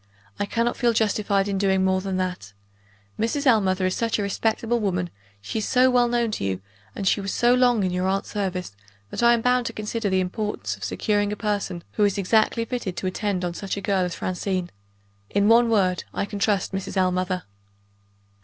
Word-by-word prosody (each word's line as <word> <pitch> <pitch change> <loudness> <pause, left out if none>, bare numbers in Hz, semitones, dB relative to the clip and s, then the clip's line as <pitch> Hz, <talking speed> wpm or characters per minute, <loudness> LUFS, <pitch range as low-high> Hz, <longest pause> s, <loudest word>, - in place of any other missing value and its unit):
I 200 - -1
cannot 230 +3 0
feel 240 -1 +2
justified 205 -2 +1
in 195 -1 -1
doing 190 -1 +2
more 190 0 +2
than 190 -1 -2
that. 180 - -3 0.7
Mrs. 255 +6 0
Ellmother 195 -7 +3
is 185 - 0
such 230 -1 0
a 210 - -1
respectable 225 +3 0
woman; 180 -4 -1 0.3
she 220 - -3
is 210 - -2
so 255 0 +4
well 245 -1 +4
known 235 -1 0
to - - -3
you, 95 -1 -1 0.4
and 195 - -3
she 200 - +3
was 195 0 -3
so 240 +1 +3
long 245 -4 +3
in 185 - 0
your 180 +1 0
aunt's 195 +1 -1
service, 185 - -3 0.4
that - - -3
I 235 0 +6
am 230 - -2
bound 250 0 +2
to 230 - -5
consider 215 0 -2
the 190 0 +2
importance 210 +3 -2
of - - -12
securing 205 -2 0
a - - -2
person 200 -5 -2
who 210 - 0
is 205 -1 +2
exactly 220 +4 +2
fitted 225 -7 -4
to - - -4
attend 185 0 -1
on 175 - -2
such 195 +2 -4
a - - -3
girl 195 -1 +1
as 180 -2 -3
Francine. 185 -1 -2 0.6
In 200 0 +2
one 230 +1 +5
word, 190 -5 +2
I - - 0
can 205 0 -6
trust 200 -2 +1
Mrs. 195 0 -4
Ellmother." 185 0 0
200 Hz, 210 wpm, -24 LUFS, 185-225 Hz, 0.7 s, I